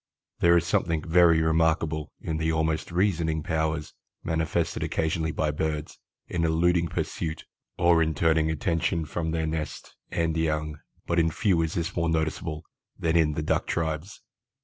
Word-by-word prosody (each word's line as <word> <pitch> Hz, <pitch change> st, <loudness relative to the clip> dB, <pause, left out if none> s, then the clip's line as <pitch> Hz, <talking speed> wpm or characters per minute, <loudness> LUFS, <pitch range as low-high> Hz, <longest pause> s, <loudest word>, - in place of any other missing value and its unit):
There 85 Hz, 0 st, +5 dB
is 85 Hz, -, +1 dB
something 80 Hz, -2 st, 0 dB
very 85 Hz, -1 st, +5 dB
remarkable 80 Hz, -1 st, +1 dB
in 80 Hz, -, -3 dB
the 80 Hz, 0 st, 0 dB
almost 80 Hz, 0 st, -1 dB
reasoning 85 Hz, -4 st, +1 dB
powers 80 Hz, -2 st, -1 dB, 0.3 s
manifested 80 Hz, 0 st, -1 dB
occasionally 80 Hz, 0 st, -1 dB
by 75 Hz, -1 st, 0 dB
birds 75 Hz, 0 st, -3 dB, 0.3 s
in 85 Hz, -2 st, -1 dB
eluding 85 Hz, +1 st, +2 dB
pursuit 80 Hz, -1 st, -4 dB, 0.3 s
or 85 Hz, -1 st, +4 dB
in 80 Hz, -1 st, +1 dB
turning 80 Hz, 0 st, +2 dB
attention 80 Hz, +2 st, 0 dB
from 80 Hz, +2 st, -3 dB
their 80 Hz, 0 st, -1 dB
nests 80 Hz, -1 st, -5 dB
and 80 Hz, -1 st, 0 dB
young, 75 Hz, -2 st, -1 dB, 0.3 s
but 85 Hz, 0 st, +1 dB
in 80 Hz, -1 st, +3 dB
few 90 Hz, -1 st, +1 dB
is 80 Hz, -1 st, -2 dB
this 85 Hz, +1 st, -2 dB
more 85 Hz, -1 st, +1 dB
noticeable 80 Hz, 0 st, -2 dB, 0.3 s
than 80 Hz, 0 st, 0 dB
in 80 Hz, -2 st, +3 dB
the 75 Hz, -, -3 dB
Duck -, -, 0 dB
tribes. 80 Hz, +3 st, -3 dB
80 Hz, 155 wpm, -26 LUFS, 80-85 Hz, 0.3 s, There